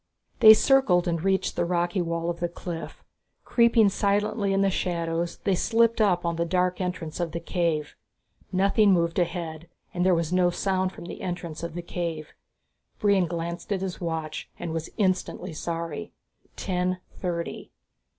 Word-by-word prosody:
They 220 Hz, 0 st, +10 dB
circled 215 Hz, -9 st, +4 dB
and 170 Hz, -1 st, -1 dB
reached 190 Hz, 0 st, +1 dB
the -, -, +1 dB
rocky 175 Hz, +2 st, 0 dB
wall 170 Hz, 0 st, -1 dB
of 170 Hz, -, -8 dB
the 175 Hz, -, -1 dB
cliff. 170 Hz, -1 st, -7 dB, 0.4 s
Creeping 235 Hz, -3 st, +4 dB
silently 205 Hz, +1 st, 0 dB
in 195 Hz, 0 st, +2 dB
the 195 Hz, -1 st, +3 dB
shadows, 170 Hz, -2 st, -2 dB
they 195 Hz, -, +2 dB
slipped 230 Hz, +4 st, +2 dB
up 180 Hz, -5 st, +2 dB
on 170 Hz, -1 st, -1 dB
the 170 Hz, -, +1 dB
dark 180 Hz, +2 st, 0 dB
entrance 180 Hz, -3 st, -4 dB
of 170 Hz, -2 st, -2 dB
the 170 Hz, -, -2 dB
cave. 170 Hz, -3 st, -1 dB, 0.6 s
Nothing 195 Hz, +2 st, +4 dB
moved 170 Hz, 0 st, +1 dB
ahead 170 Hz, -2 st, -3 dB, 0.2 s
and 180 Hz, -, 0 dB
there 185 Hz, -1 st, +4 dB
was 165 Hz, 0 st, -1 dB
no 180 Hz, -1 st, +4 dB
sound 185 Hz, +1 st, 0 dB
from 170 Hz, -, -10 dB
the -, -, -8 dB
entrance 175 Hz, -3 st, -5 dB
of 170 Hz, -1 st, -5 dB
the 175 Hz, -, -4 dB
cave. 165 Hz, -3 st, -4 dB, 0.6 s
Brion 200 Hz, -4 st, +3 dB
glanced 170 Hz, +3 st, -5 dB
at 195 Hz, -2 st, 0 dB
his 190 Hz, -2 st, -4 dB
watch 160 Hz, -2 st, -4 dB
and 165 Hz, -, -4 dB
was 165 Hz, 0 st, -3 dB
instantly 185 Hz, -5 st, -1 dB
sorry. 165 Hz, -, -4 dB, 0.4 s
Ten 185 Hz, -1 st, -1 dB, 0.2 s
thirty. 170 Hz, -2 st, -4 dB
175 Hz, 165 wpm, -26 LUFS, 170-190 Hz, 0.6 s, They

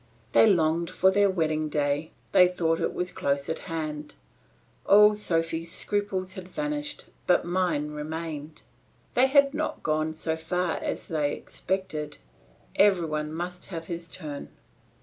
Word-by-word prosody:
They -, -, +6 dB
longed 170 Hz, -3 st, +2 dB
for 190 Hz, -, +3 dB
their 200 Hz, +1 st, +4 dB
wedding 155 Hz, -4 st, 0 dB
day; 145 Hz, +1 st, 0 dB, 0.2 s
they 180 Hz, -, +7 dB
thought 165 Hz, -2 st, 0 dB
it -, -, 0 dB
was 180 Hz, 0 st, -2 dB
close 140 Hz, 0 st, -1 dB
at 160 Hz, -, -2 dB
hand; 155 Hz, -2 st, -4 dB, 0.7 s
all 210 Hz, +1 st, +7 dB
Sophy's 165 Hz, -4 st, -1 dB
scruples 195 Hz, -3 st, -1 dB
had 185 Hz, -1 st, -8 dB
vanished, 295 Hz, +3 st, -4 dB, 0.2 s
but 180 Hz, -, +4 dB
mine 175 Hz, -4 st, 0 dB
remained. 155 Hz, 0 st, -6 dB, 0.5 s
They 255 Hz, +2 st, +5 dB
had 280 Hz, +1 st, +5 dB
not 310 Hz, +1 st, -3 dB
got 155 Hz, +1 st, 0 dB
so 160 Hz, 0 st, -2 dB
far 170 Hz, +1 st, -1 dB
as -, -, -3 dB
they 150 Hz, -3 st, 0 dB
expected; 155 Hz, -6 st, -4 dB, 0.6 s
every 195 Hz, -4 st, +5 dB
one 150 Hz, -1 st, -2 dB
must 175 Hz, +2 st, -5 dB
have 165 Hz, -3 st, -6 dB
his 170 Hz, 0 st, -6 dB
turn. 150 Hz, -5 st, -7 dB
165 Hz, 145 wpm, -27 LUFS, 155-190 Hz, 0.7 s, they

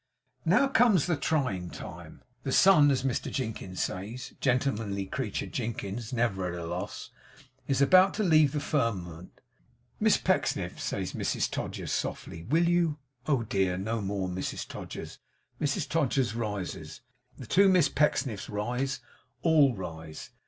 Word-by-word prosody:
Now 275 Hz, -, +4 dB
comes 230 Hz, -, +4 dB
the 175 Hz, -2 st, +1 dB
trying 130 Hz, -, -1 dB
time. -, -, -10 dB, 0.2 s
The 135 Hz, -, -3 dB
sun, 160 Hz, -3 st, +6 dB
as 130 Hz, -2 st, +1 dB
Mr 130 Hz, -3 st, -1 dB
Jinkins 110 Hz, -7 st, -4 dB
says 110 Hz, +7 st, -5 dB
(gentlemanly 115 Hz, -7 st, 0 dB
creature, 110 Hz, 0 st, -3 dB
Jinkins 115 Hz, -1 st, -4 dB
never 105 Hz, -7 st, 0 dB
at 85 Hz, -, -5 dB
a 85 Hz, -, -5 dB
loss!), 85 Hz, +2 st, -5 dB, 0.6 s
is 135 Hz, 0 st, +3 dB
about 185 Hz, +6 st, +6 dB
to 215 Hz, -, 0 dB
leave 155 Hz, -6 st, +5 dB
the 150 Hz, -, 0 dB
firmament. 95 Hz, -, -2 dB, 0.6 s
'Miss -, -, +4 dB
Pecksniff!' -, -, 0 dB
says -, -, -3 dB
Mrs -, -, -1 dB
Todgers, -, -, -4 dB
softly, 85 Hz, -, -3 dB
'will 160 Hz, -, +2 dB
you 170 Hz, -3 st, +2 dB
?' 125 Hz, -1 st, -29 dB
'Oh 135 Hz, -6 st, +2 dB
dear, 95 Hz, -4 st, 0 dB
no 110 Hz, +4 st, -2 dB
more, 100 Hz, -1 st, -2 dB
Mrs 90 Hz, +1 st, -4 dB
Todgers.' -, -, -8 dB, 0.4 s
Mrs 145 Hz, -1 st, 0 dB
Todgers 135 Hz, -7 st, +1 dB
rises; 100 Hz, -6 st, -4 dB, 0.4 s
the 130 Hz, -, -8 dB
two 195 Hz, -, +5 dB
Miss 180 Hz, -5 st, +5 dB
Pecksniffs 135 Hz, -8 st, 0 dB
rise; 125 Hz, +6 st, -2 dB, 0.4 s
all 150 Hz, -6 st, +5 dB
rise. 80 Hz, -4 st, -8 dB
125 Hz, 145 wpm, -29 LUFS, 95-145 Hz, 0.6 s, sun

